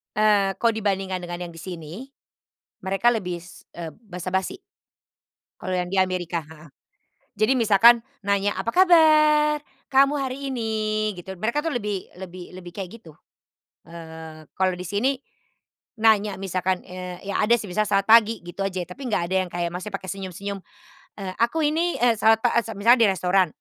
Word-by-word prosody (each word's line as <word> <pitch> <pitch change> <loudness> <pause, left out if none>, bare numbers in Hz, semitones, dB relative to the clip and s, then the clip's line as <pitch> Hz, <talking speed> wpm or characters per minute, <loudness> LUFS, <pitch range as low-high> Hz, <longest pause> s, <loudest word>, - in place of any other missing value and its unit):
Eee, 210 -2 +3
kalau 230 -1 +2
dibandingkan 195 -3 -2
dengan 175 0 -5
yang 170 - -12
di 165 - -10
sini. 165 -4 -8 0.9
Mereka 195 +6 +2
lebih, 180 -5 -6 0.2
eee, 165 -3 -6
basa-basi. 190 - -4 1.0
Kalau 185 - -4
yang 180 -1 -2
di 195 - -1
Amerika 180 -2 0
heeh. 155 -1 -15 0.6
Jadi 215 +5 +2
misalkan 230 +1 +6 0.2
nanya, 200 0 +1
"Apa 230 - -3
kabar, 305 -3 +5 0.3
kamu 275 +1 +4
hari 260 0 -3 0.2
ini?" 215 -2 -1
Gitu, 190 +2 -8
mereka 225 +10 -1
tuh 325 - -1
lebih 205 -5 -3 0.2
lebih 180 -1 -9
lebih 180 -1 -10
kayak 200 +3 -7
gitu. 160 -6 -16 0.7
Eee, 160 -1 -10
kalau 185 -1 +1
di 180 - -7
sini 210 +9 0 0.8
nanya 215 -2 +3
misalkan, 185 -1 -1
eee, 180 0 -8
ya 200 - -1
ada 235 +3 +5
sih 215 - -7
misal 215 +3 +1
"selamat 200 0 +1
pagi" 225 -3 +6
gitu 175 +3 -8
aja 185 -2 -3
ya, - - -35
tapi 255 +7 -7
nggak 175 - 0
ada - - +1
yang - - -11
kayak 170 -1 -2
masih 180 +3 -5
pakai 190 -1 -5
senyum-senyum, 195 +1 -6 0.6
eee, 185 -1 -5
aku 240 +8 +1
ini, 330 +4 0
eee, 240 -1 +4
salet 220 0 +5
ta 245 - +2
e - - +5
sem 225 -2 -7
misalnya 235 +4 +5
di - - +4
restoran, 185 0 +2
195 Hz, 170 wpm, -24 LUFS, 180-230 Hz, 1.0 s, misalkan